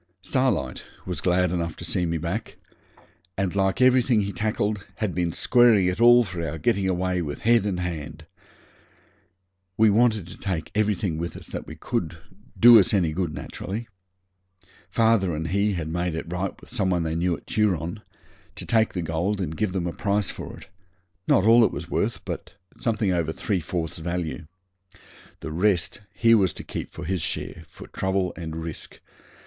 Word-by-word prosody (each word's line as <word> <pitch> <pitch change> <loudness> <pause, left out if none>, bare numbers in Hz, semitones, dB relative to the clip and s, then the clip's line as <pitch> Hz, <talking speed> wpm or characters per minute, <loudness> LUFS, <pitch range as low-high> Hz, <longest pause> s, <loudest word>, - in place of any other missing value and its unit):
Starlight 120 - 0 0.2
was 90 -5 -3
glad 90 -1 +2
enough 85 -2 -2
to - - -8
see 90 -1 0
me 85 0 -1
back, 85 +7 -4 0.8
and 95 -1 -1
like 95 +1 +1
everything 125 -3 +4
he 100 0 -3
tackled, 105 +1 -1
had 105 -5 -2
been 85 -1 0
squaring 120 -2 +4
it 90 +4 -1
all 120 +1 +8
for 90 -5 -5
our 80 0 -3
getting 95 +3 +1
away 90 0 0
with 75 -3 -5
head 115 -2 +3
and 95 -3 -2
hand. 85 -4 -5 1.5
We 110 -1 +5
wanted 110 -3 +3
to - - -11
take 90 -5 -3
everything 100 -6 0
with 85 0 -4
us - - -10
that - - -5
could 90 -9 -2 0.4
do 120 -1 +10
us 105 +3 +3
any 85 -5 +1
good, 90 -1 -1
naturally. 110 +5 -6 1.0
Father 110 -4 +2
and 80 +1 -3
he 100 +3 +1
had 85 -4 -3
made 85 +1 -2
it 80 +1 -5
right 95 +2 -3
with - - -15
some 105 -6 0
one 90 -2 +1
they 80 -1 -2
knew 85 0 0
at - - -19
Turon 100 -2 0 0.5
to - - -6
take 110 -1 +2
the 90 - -2
gold 85 +6 -1
and 80 -4 -3
give 105 +2 -1
them 90 -2 -2
a 85 - -2
price 100 -1 0
for - - -8
it - - -13 0.6
not 95 - +4
all 115 +1 +7
it - - +3
was - - -7
worth, - - -1
but - - -6 0.2
something 110 -6 0
over 85 -2 0
three 95 +3 -1
fourths 80 -1 -4
value. 85 -2 -4 0.9
The 80 - -5
rest 90 +2 +1
he 115 +3 +4
was 100 -5 +4
to - - -8
keep - - -6
for - - -8
his 95 0 -1
share, 80 +1 -4
for - - -12
trouble 95 -1 -1
and 80 -2 -6
risk. 80 -2 -7
95 Hz, 180 wpm, -25 LUFS, 85-105 Hz, 1.5 s, do